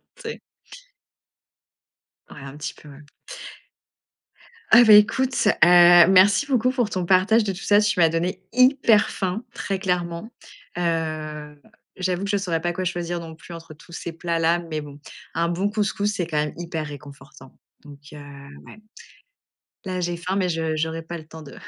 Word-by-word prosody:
tu - - -17
sais? - - -7 1.9
Ouais, 145 - -12
un 135 +1 -10
petit 155 +1 -6
peu, 150 - -16
ouais. 140 +1 -14 1.7
Ah 240 - +8
bah, 220 -2 +7
écoute, 250 +5 +4
heu, - - +2
merci 180 +6 +6
beaucoup 255 -2 +1
pour 245 -5 -1
ton 180 -2 -3
partage 195 +5 +3
de 200 - -2
tout 185 - -8
ça. 205 0 +4
Tu 205 -3 0
m'as 165 -1 +5
donné 180 +3 -3
hyper 255 -4 +3
faim, 195 +4 -4
très 195 -2 -4
clairement. 180 +3 -3 0.5
Heu, 155 -3 -4 0.4
j'avoue 185 0 -2
que - - -5
je 205 - +1
saurais 170 -5 -2
pas 175 0 -1
quoi 185 +1 -4
choisir 175 -1 -3
non 165 -1 -10
plus 170 +1 -13
entre 165 -1 -11
tous 165 +3 -19
ces 170 0 -6
plats-là, 170 0 0
mais 160 -3 -6
bon, 145 0 -12 0.3
un 170 +1 0
bon 190 +4 -1
couscous, 205 -1 -2
c'est 180 -3 -3
quand 155 - -3
même 150 0 -1
hyper 165 -2 -5
réconfortant 145 -1 -13 0.3
donc 145 -1 -13 0.2
heu, - - -10 0.5
ouais, - - -13 1.1
là 185 -1 -4
j'ai 175 0 -2
faim, 185 +3 -4
mais 185 -2 0
je 160 -2 -2
j'aurais 160 +1 -3
pas 170 +1 -8
le 155 -1 -13
temps 160 0 -12
de 145 - -12
175 Hz, 175 wpm, -22 LUFS, 160-195 Hz, 1.9 s, Ah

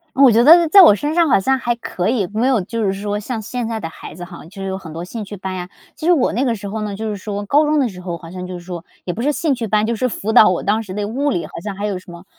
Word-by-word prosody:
我 270 -1 +7
觉 230 +2 +4
得 335 +4 +7
在 395 +4 +9
我 270 - +8
身 295 +8 -2
上 335 -2 +3
好 235 - +5
像 265 +7 +1
还 240 -1 -1
可 185 -5 -3
以， 220 -6 0
没 225 +4 +1
有 260 -4 +3
就 230 +5 -3
是 195 -2 +1
说 205 +1 -3
像 225 +2 -4
现 235 +2 -4
在 225 -1 -3
的 165 - -5
孩 - - -11
子 175 +1 -8
哈， 175 -1 -11
就 195 +4 -11
是 - - -3
有 190 - -3
很 170 -4 -10
多 165 +2 -6
兴 220 +4 -6
趣 205 0 -8
班 190 0 -5
呀。 180 0 -6 0.3
其 - - -7
实 - - +6
我 295 -8 +2
那 240 +6 0
个 235 -3 +1
时 205 -1 -7
候 215 +2 -4
呢， 210 -1 -4
就 220 +2 -4
是 210 - -3
说， 205 +1 -5
高 290 +9 +3
中 300 0 +2
的 265 - +2
时 180 -3 -10
候 175 -2 -5
好 165 0 -12
像 180 0 -6
就 185 - -6
是 - - -7
说， 175 -1 -7 0.2
也 175 - -2
不 225 - -5
是 285 +4 +2
兴 295 0 0
趣 235 -3 -3
班， 215 +1 +2
就 230 +1 -1
是 255 +3 0
辅 220 -1 -3
导 220 - +8
我 180 - -1
当 210 +3 +1
时 195 -4 -8
的 205 0 -2
物 275 +7 -1
理， 175 -11 -1
好 - - -12
像 205 -2 -5
还 205 +2 -4
有 200 -3 -2
什 180 - -14
么， 170 +2 -12
210 Hz, 370 characters per minute, -19 LUFS, 190-245 Hz, 0.3 s, 在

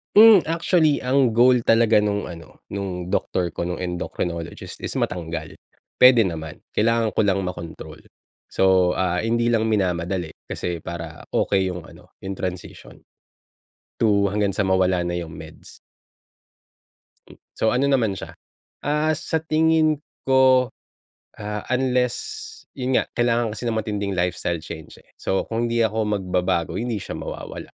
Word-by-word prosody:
Hmm, 215 -3 +9
actually, 165 -2 +2
ang 130 -1 +2
goal 120 +1 +4
talaga 115 -2 +4
nung 105 -1 -1
ano, 85 -2 -11
nung 95 -3 -4
doctor 90 -2 0
ko, - - -2
nung 90 +1 -3
endocrinologist, 90 -1 -5
is - - -3
matanggal 80 -3 -3 0.5
pwede 125 -3 +8
naman. 80 -3 -6 0.2
Kailangan 115 0 +2
ko - - +3
lang 100 -1 +2
makontrol. 85 -2 -7 0.5
So, 95 -2 +3
ah, 90 -1 0
hindi 120 +1 +1
lang 110 -1 +2
minamadali 90 -4 -1 0.2
kasi 85 -2 -3
para 85 -2 -7
okey 95 -2 +1
yung 90 -2 -7
ano, - - -16 0.2
yung 95 - -3
transition 90 -1 -6 1.0
to 100 -3 +3
hanggang 100 0 0
sa 100 - -3
mawala 95 -1 +2
na 85 - -2
yung 85 -2 -5
meds. - - -12 1.5
Mm, - - -15 0.2
so 110 - +1
ano 130 +3 +2
naman 115 -8 +1
siya - - -8 0.5
Ah, 150 +2 +1
sa 160 +2 -2
tingin 155 -1 +2 0.2
ko, 130 -1 +5 0.7
ah, 105 0 -5
unless 130 - -1 0.3
yun 130 0 -1
nga, - - +1
kailangan 120 -1 +1
kasi 105 +3 -6
ng 115 - 0
matinding 105 -2 -2
lifestyle 90 -2 -1
change, 80 -2 -10
eh. - - -35
So 95 - 0
kung 115 +1 0
hindi 115 0 +1
ako 110 0 0
magbabago, 95 -4 -1
hindi 120 +1 -2
siya - - -6
mawawala, - - -7
105 Hz, 145 wpm, -23 LUFS, 90-125 Hz, 1.5 s, Hmm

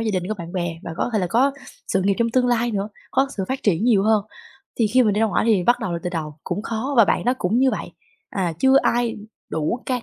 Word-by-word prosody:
gia 225 -1 0
đình, 180 0 -2
có 215 - -1
bạn 170 -3 -8
bè 175 -3 -3
và 165 - -6
có - - -1
thể 215 - +2
là 185 - 0
có 260 +9 +2 0.4
sự 190 - +1
nghiệp 200 +1 +2
trong 230 0 +1
tương 250 0 +2
lai 240 0 +1
nữa, 205 -1 -2 0.2
có 270 - +2
sự 195 - -1
phát 265 +1 -3
triển 205 +1 +1
nhiều 215 -5 +4
hơn. 215 -1 +2 0.6
Thì 220 - +4
khi 255 +4 +4
mình 210 -3 +2
đi 210 - 0
ra 225 - +4
ngoải 215 - 0
thì 205 -6 +3
bắt 240 +6 +3
đầu 185 - -3
lại 170 - -3
từ 180 - -3
đầu, 155 -3 -5
cũng 190 +4 -3
khó 230 +6 -3
và 230 - +8
bạn - - 0
đó 250 +1 +2
cũng 205 +7 +1
như 265 0 +4
vậy. - - -5 0.4
À, 180 -4 -1
chưa 265 0 +5
ai 235 -1 +1 0.3
đủ 160 +11 -1
can 250 -2 -1
215 Hz, 280 wpm, -22 LUFS, 185-240 Hz, 0.6 s, và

